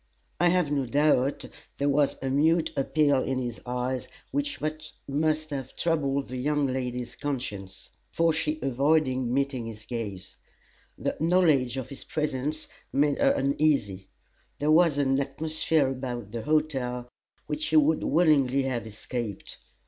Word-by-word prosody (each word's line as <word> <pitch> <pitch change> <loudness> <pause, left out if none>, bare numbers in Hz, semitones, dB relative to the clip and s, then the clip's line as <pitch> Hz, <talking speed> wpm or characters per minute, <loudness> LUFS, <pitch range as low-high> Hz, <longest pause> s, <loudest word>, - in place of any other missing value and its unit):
I 175 - +4
have 175 -4 +2
no 140 -3 0
doubt 140 0 +2 0.3
there 140 - 0
was 145 0 +2
a 135 - -1
mute 160 +4 +3
appeal 145 0 +2
in 135 0 -1
his 120 -2 -4
eyes 125 +1 -2 0.2
which 285 0 -1 0.5
must 155 +2 0
have 135 -2 -5
troubled 140 -5 0
the 130 - -4
young 145 +2 +1
lady's 125 -2 -3
conscience; 105 -9 -5 0.2
for 165 -1 +2
she 155 -1 0
avoided 135 +1 +2
meeting 130 -1 -1
his 110 -1 -9
gaze. 100 -6 -6 0.6
The - - -2
knowledge 155 -7 +3
of 130 - -4
his 140 - -8
presence 150 0 -2 0.2
made 145 +1 +2
her - - +4
uneasy; 135 -9 +1 0.5
there 150 +1 +1
was 165 -2 +5
an 135 -1 +2
atmosphere 155 +1 +1
about 125 -5 -5
the 115 0 -4
hotel 135 -4 0 0.4
which 150 0 -2
she 155 - 0
would 155 +1 +4
willingly 140 -5 +3
have 120 -4 -2
escaped. 110 0 -5
140 Hz, 140 wpm, -27 LUFS, 125-155 Hz, 0.6 s, was